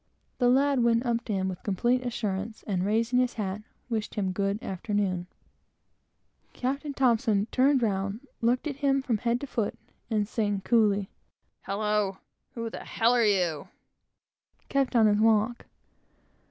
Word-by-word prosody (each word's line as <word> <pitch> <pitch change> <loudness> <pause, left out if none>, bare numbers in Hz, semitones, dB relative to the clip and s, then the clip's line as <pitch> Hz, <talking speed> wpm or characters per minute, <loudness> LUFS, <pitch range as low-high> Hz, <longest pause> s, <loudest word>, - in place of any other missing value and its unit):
The 245 -2 +4
lad 275 +1 +3
went 235 +1 +2
up 235 -1 0
to 215 - -2
him 190 -1 0
with 185 -1 -4
the - - -5
most 195 - 0
complete 245 +5 +2
assurance, 215 -3 -3
and 185 -4 -1
raising 225 +5 +1
his 250 -1 +1
hat, 205 -1 -3 0.3
wished 220 -3 -3
him 200 -3 0
a - - -1
good 200 +2 -1
afternoon. 190 -3 -2 1.3
Captain 275 +3 -2
T 230 -6 +2
turned 265 0 +3
round, 200 +1 -1 0.2
looked 240 +4 +1
at 285 -3 -3
him 275 -1 +1
from 230 -5 0
head 235 +2 0
to - - -3
foot, 225 -6 -2 0.3
and 210 -3 0
saying 205 -3 -1
coolly, 205 -3 +2 0.5
"Hallo! 210 -1 -1 0.4
who 230 -1 -4
the - - -7
h - - -10
are 240 +1 +5
you?" 180 -8 +1 1.0
kept 275 -2 0
on 225 -2 +6
his 210 -1 +3
walk. 225 +1 +2
220 Hz, 160 wpm, -28 LUFS, 200-245 Hz, 1.3 s, on